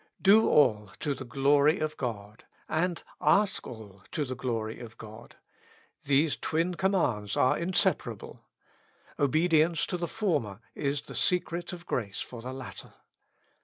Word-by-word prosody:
'''Do 210 +3 +6
all 105 -8 +3
to 145 - -1
the 135 - -7
glory 140 +4 +3
of 155 0 -2
God," 105 -4 -6 0.2
and, 170 +2 -1 0.2
^^Ask 200 -1 +2
all 105 -4 -11
to 150 - -2
the 130 - -4
glory 115 -4 -3
of 115 -2 -10
God," 110 +1 -12 0.4
— - - -31
these 145 +2 +3
twin 165 +3 -1
com 190 +3 0
mands 105 - 0
are 130 - +4
inseparable: 175 +2 0 0.8
obedience 155 +2 +3
to 180 - -3
the 170 0 -3
former 150 - -1
is 140 0 -2
the - - -10
secret 175 -1 +1
of 175 -1 -9
grace 100 - -3
for 120 -2 -7
the 125 +2 -6
latter. 130 -1 -9
140 Hz, 150 wpm, -29 LUFS, 115-170 Hz, 0.8 s, Do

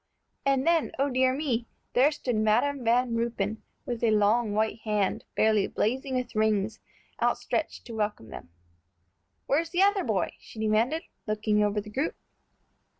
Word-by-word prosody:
And 270 0 +2
then, 335 -2 +2
O 275 +1 +1
dear 255 0 +3
me! 250 -5 -1 0.3
there 265 +5 +5
stood 255 -5 -2
Madam 240 +6 +2
Van 240 +1 +2
Ruypen, 230 -2 -1 0.2
with 240 -2 -4
a 230 - +4
long 215 +1 +3
white 220 +1 0
hand, 210 -3 -1
fairly 215 -2 +3
blazing 260 +4 -1
with 250 -1 -2
rings, 215 -1 +1 0.4
outstretched - - -1
to 235 - -8
welcome 210 - -3
them. - - -9 1.0
"Where's 325 +4 +1
the 355 +3 +3
other 400 -1 +3
boy?" - - 0
she - - -15
demanded, 220 +9 +1 0.2
looking 215 0 +1
over 205 0 +1
the 210 +1 -8
group. 275 +9 -1
230 Hz, 150 wpm, -28 LUFS, 215-265 Hz, 1.0 s, there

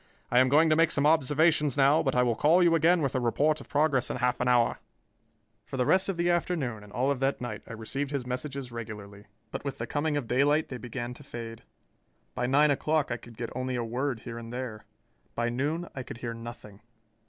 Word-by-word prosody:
I 120 - +5
am 130 0 +4
going 155 +4 +5
to - - +5
make 165 +1 +4
some 140 0 +1
observations 150 -1 +3
now, 140 +3 +5
but 135 -4 0
I 125 - +4
will 120 -1 +2
call 160 +10 +4
you 170 -1 +4
again 165 +1 +4
with 135 - 0
a 130 - +1
report 145 +6 +1
of - - -14
progress 145 -3 +2
in - - -2
half 125 0 0
an 125 - 0
hour." 120 -2 +3 0.8
For - - -7
the 125 - +1
rest 190 +6 +3
of 190 - -2
the 170 0 +1
afternoon 160 -11 -1
and 105 - -14
all 130 +4 +1
of 140 - -2
that 135 +1 0
night 115 -4 -5
I - - -8
received 135 +6 -4
his 140 -3 -3
messages 130 0 -4
regularly, 105 -3 -8 0.3
but - - -5
with 140 -2 -4
the 115 - -3
coming 145 +3 -1
of 140 - -2
daylight 145 +5 +2
they 125 - -6
began 120 +1 -5
to 135 - -12
fade. 115 -4 -8 0.7
By 125 - -1
nine 145 +3 +4
o'clock 150 +1 0
I - - -1
could 115 -2 -15
get 115 0 -5
only 130 0 -2
a 120 - -1
word 120 +1 -2
here 115 -1 -7
and 115 0 -9
there. 120 -4 -6 0.5
By 120 0 0
noon 150 +8 -2
I 130 - -5
could 125 - -8
hear 115 -1 -5
nothing. 115 -3 -10
130 Hz, 235 wpm, -28 LUFS, 120-150 Hz, 0.8 s, I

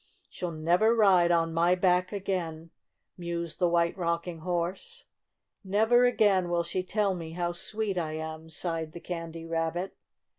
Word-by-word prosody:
"She'll 180 - -4
never 175 +8 +2
ride 190 -6 +5
on 165 -1 +2
my 170 +2 +3
back 180 0 +2
again," 170 -5 -3 0.5
mused 170 -1 -4
the 175 -2 +3
White 170 0 +2
Rocking 170 -1 -2
Horse. 180 - -3 0.6
"Never 220 +5 +4
again 205 -7 +3
will 170 0 +1
she 175 +2 -2
tell 200 +1 0
me 165 -3 -6
how 175 0 -1
sweet 200 +2 -2
I 155 -2 -3
am," 160 0 -6
sighed 160 -1 -3
the 170 - -7
Candy 165 -1 -6
Rabbit. 165 +3 -2
175 Hz, 150 wpm, -28 LUFS, 165-190 Hz, 0.6 s, ride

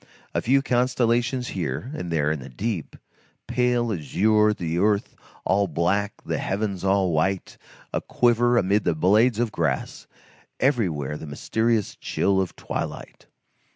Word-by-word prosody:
A - - 0
few 135 +3 +3
constellations 120 -1 +1
here 85 - -3
and 90 - -5
there 75 -2 +1
in 80 - -2
the 65 - -9
deep, 95 - -4 0.5
pale 120 -2 +1
azure, 105 +7 +2
the 85 -4 -2
earth 105 +1 +1 0.3
all 100 0 +2
black, 95 +5 -1
the - - -2
heavens 100 -2 -2
all 95 -2 +2
white, 90 +4 0 0.4
a - - 0
quiver 120 0 +2
amid 100 0 +2
the 85 - +1
blades 105 +8 +3
of 120 -1 0
grass, - - -2 0.5
everywhere 85 - 0
the 80 - -9
mysterious 110 +8 0
chill 95 -1 0
of 95 - -4
twilight. - - -6
100 Hz, 140 wpm, -24 LUFS, 85-120 Hz, 0.5 s, few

